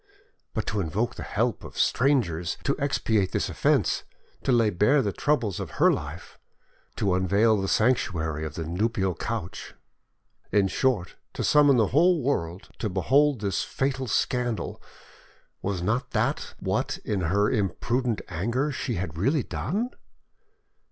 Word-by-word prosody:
But 110 - -1
to 105 - -2
invoke 100 +8 -1
the - - -8
help, 115 -1 -1
of - - -10
strangers 95 - +1
to 140 - +1
expiate 110 -9 0
this - - 0
offence; - - +1 0.4
to - - 0
lay 115 -3 +4
bare 120 +10 +3
the 100 -3 -1
troubles 120 - 0
of - - -6
her - - +5
life, - - -7 0.6
to 100 -3 +1
unveil 100 +4 +3
the 95 - -2
sanctuary 85 -10 +1
of 80 -1 -5
the 80 - -3
nuptial 95 +2 0
couch—in 100 0 -5
short, 120 -9 0 0.2
to - - -3
summon 145 -3 +5
the 110 -4 +3
whole 170 0 +4
world 90 -9 -2
to 110 - -1
behold 130 - +2
this 100 -2 0
fatal 135 -1 -2
scandal, 120 +1 -1 0.8
was 95 -3 -2
not 115 +7 0
that - - -1
what - - -1
in 100 -3 -1
her 100 +5 +2
imprudent 120 +2 0
anger 120 - -1
she 130 -3 -3
had 85 -4 -4
really 135 - +2
done? 220 - -2
110 Hz, 145 wpm, -26 LUFS, 95-130 Hz, 0.8 s, her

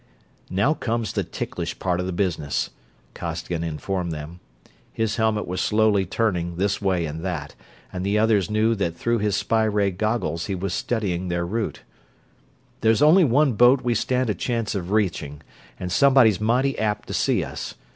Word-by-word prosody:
"Now 100 +11 +2
comes 115 -6 -2
the 100 - 0
ticklish 85 - -5
part 90 -1 -1
of 90 - -2
the - - -2
business," 85 -6 -1 0.4
Costigan 85 0 -4
informed 85 +2 -3
them. 80 +3 -7 0.5
His 115 -1 -1
helmet 110 -2 +1
was 90 +1 -2
slowly 105 -3 +2
turning 90 -5 -1
this 100 +3 0
way 95 -4 +1
and 80 +2 -6
that, 80 -6 -4 0.4
and 90 0 -3
the 100 +2 +1
others 105 -4 +2
knew 110 +2 +2
that 85 -6 -2
through 115 +5 0
his 105 -1 0
spy 110 +3 +1
ray 105 -2 +1
goggles 90 -5 -1
he 95 - -2
was 95 0 -3
studying 95 -7 -1
their 85 0 -1
route. 110 +5 -3 1.0
"There's 110 +5 +3
only 170 +5 +7
one 140 +1 +3
boat 125 +4 +5
we 120 - +1
stand 125 +1 0
a - - 0
chance 115 0 -2
of 95 -3 -4
reaching, 80 -8 -1 0.4
and 90 -1 -4
somebody's 125 -5 +5
mighty 125 +5 +1
apt 105 -2 -1
to - - -4
see - - +1
us. - - -6
100 Hz, 175 wpm, -23 LUFS, 90-115 Hz, 1.0 s, only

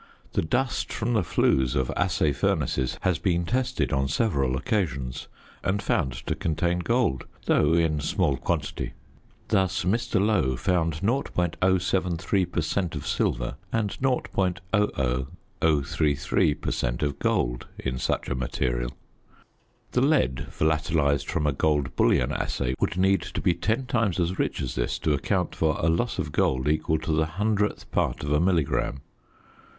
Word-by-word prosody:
The - - +2
dust 120 +10 -1
from 120 +2 -1
the 110 - +3
flues 65 -5 +2
of 65 -3 0
assay 90 -5 +1
furnaces 65 -1 0
has 90 -3 +1
been 85 -3 +1
tested 125 -1 0
on 70 0 +1
several 70 - +1
occasions 70 - -2 0.4
and 95 +2 +1
found 65 -9 0
to - - 0
contain 85 +2 0
gold, 115 - 0 0.2
though 75 +2 +3
in 80 -2 +2
small 70 -1 +1
quantity. 65 - -2 0.6
Thus 95 -2 +1
Mr. 115 +3 +1
Lowe 95 -11 +2
found 85 0 0
.073 95 -4 +1
per 85 - 0
cent. 85 +1 -1
of 75 - -5
silver - - -1
and 110 -3 0
.00033 80 - 0
per - - -1
cent. - - -1
of 70 -1 -1
gold - - 0
in 65 -1 -3
such 65 - -1
a - - -1
material. 60 0 -2 0.9
The 125 - +2
lead 130 - +2
volatilised 75 -2 +1
from 85 -4 0
a 75 - +2
gold 75 -1 0
bullion - - +3
assay 65 -2 -1
would - - 0
need 95 -1 +3
to - - -5
be 90 - +2
ten 110 +8 -1
times 115 -7 0
as 90 +2 -1
rich - - -1
as - - -3
this - - -1
to 75 - +1
account 90 +6 0
for 80 -1 +1
a 80 - +2
loss 100 +8 0
of 75 - -2
gold 65 -1 +1
equal 80 +1 +1
to 80 - -3
the 80 0 +2
hundredth 105 0 0
part - - 0
of 75 - -2
a 75 - +3
milligram. 80 -6 +1
80 Hz, 150 wpm, -26 LUFS, 70-95 Hz, 0.9 s, the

